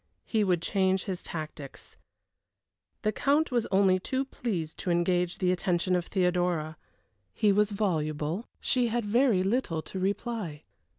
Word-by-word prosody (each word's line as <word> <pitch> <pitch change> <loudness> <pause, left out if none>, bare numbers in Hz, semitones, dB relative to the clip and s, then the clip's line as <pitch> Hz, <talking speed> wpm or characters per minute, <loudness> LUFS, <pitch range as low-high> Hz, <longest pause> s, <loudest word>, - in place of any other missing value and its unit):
He 220 -2 +1
would 180 -4 +1
change 190 0 +1
his 190 -4 -4
tactics. 155 -3 -7 1.1
The 215 - +2
Count 285 +8 +2
was 240 -2 +1
only 190 -1 +4
too 260 +8 -2
pleased 185 -12 -4
to 185 - -3
engage 175 +1 +1
the 180 -1 +2
attention 180 0 +1
of 175 -1 -1
Theodora. 180 -4 0 0.6
He 210 - +3
was 210 +1 +3
voluble; 165 -2 -1
she 250 -2 +1
had 235 0 -1
very 225 -3 +3
little 190 -7 0
to 190 - -6
reply. 195 -5 -2
185 Hz, 140 wpm, -29 LUFS, 175-215 Hz, 1.1 s, only